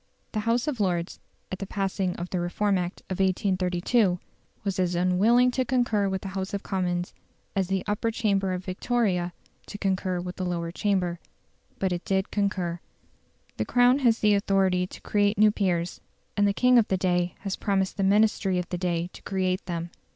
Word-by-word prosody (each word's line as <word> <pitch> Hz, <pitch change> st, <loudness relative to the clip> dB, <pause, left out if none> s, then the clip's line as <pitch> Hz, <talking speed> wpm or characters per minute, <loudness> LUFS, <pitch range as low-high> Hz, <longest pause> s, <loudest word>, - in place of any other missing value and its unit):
The 215 Hz, -, -1 dB
House 240 Hz, +3 st, +1 dB
of 280 Hz, -6 st, -2 dB
Lords, 175 Hz, -3 st, -1 dB, 0.3 s
at 190 Hz, -, -4 dB
the 195 Hz, -, -5 dB
passing 195 Hz, -2 st, -1 dB
of 175 Hz, +1 st, -6 dB
the 185 Hz, -, 0 dB
Reform 195 Hz, +4 st, 0 dB
Act 175 Hz, +1 st, -4 dB
of 185 Hz, -, -4 dB
1832, 185 Hz, +1 st, +2 dB, 0.5 s
was 195 Hz, -2 st, -2 dB
as 180 Hz, -1 st, +1 dB
unwilling 205 Hz, +8 st, +4 dB
to 255 Hz, +1 st, 0 dB
concur 240 Hz, -5 st, +1 dB
with 190 Hz, -1 st, -3 dB
the 195 Hz, -, -4 dB
House 190 Hz, +1 st, -3 dB
of 200 Hz, -, -4 dB
Commons 180 Hz, -2 st, -2 dB, 0.4 s
as 190 Hz, -2 st, +1 dB
the 190 Hz, 0 st, -1 dB
Upper 210 Hz, +2 st, 0 dB
Chamber 200 Hz, -4 st, 0 dB
at 180 Hz, 0 st, -4 dB
Victoria 185 Hz, -2 st, 0 dB, 0.4 s
to 205 Hz, -, -7 dB
concur 190 Hz, -2 st, -1 dB
with 180 Hz, +1 st, -6 dB
the 185 Hz, -, -3 dB
Lower 170 Hz, -2 st, -2 dB
Chamber. 180 Hz, -3 st, 0 dB, 0.6 s
But 190 Hz, -1 st, 0 dB
it 175 Hz, 0 st, -2 dB
did 190 Hz, 0 st, 0 dB
concur. 185 Hz, -4 st, -1 dB, 0.8 s
The -, -, -1 dB
Crown 245 Hz, +2 st, +4 dB
has 235 Hz, -4 st, +3 dB
the 210 Hz, -1 st, +5 dB
authority 190 Hz, -2 st, +2 dB
to -, -, -12 dB
create 205 Hz, 0 st, +1 dB
new 215 Hz, 0 st, +6 dB
peers; 180 Hz, -4 st, -1 dB, 0.3 s
and 205 Hz, -1 st, +3 dB
the -, -, +3 dB
king 250 Hz, +4 st, +5 dB
of 220 Hz, -, +2 dB
the 190 Hz, -, +1 dB
day 180 Hz, -1 st, 0 dB
had 195 Hz, -2 st, -4 dB
promised 195 Hz, -2 st, 0 dB
the 195 Hz, -, 0 dB
Ministry 200 Hz, -1 st, +3 dB
of 180 Hz, -1 st, -3 dB
the 180 Hz, -, -3 dB
day 175 Hz, -1 st, -1 dB
to -, -, -12 dB
create 185 Hz, -1 st, -1 dB
them. 170 Hz, -1 st, -4 dB
190 Hz, 190 wpm, -26 LUFS, 180-205 Hz, 0.8 s, new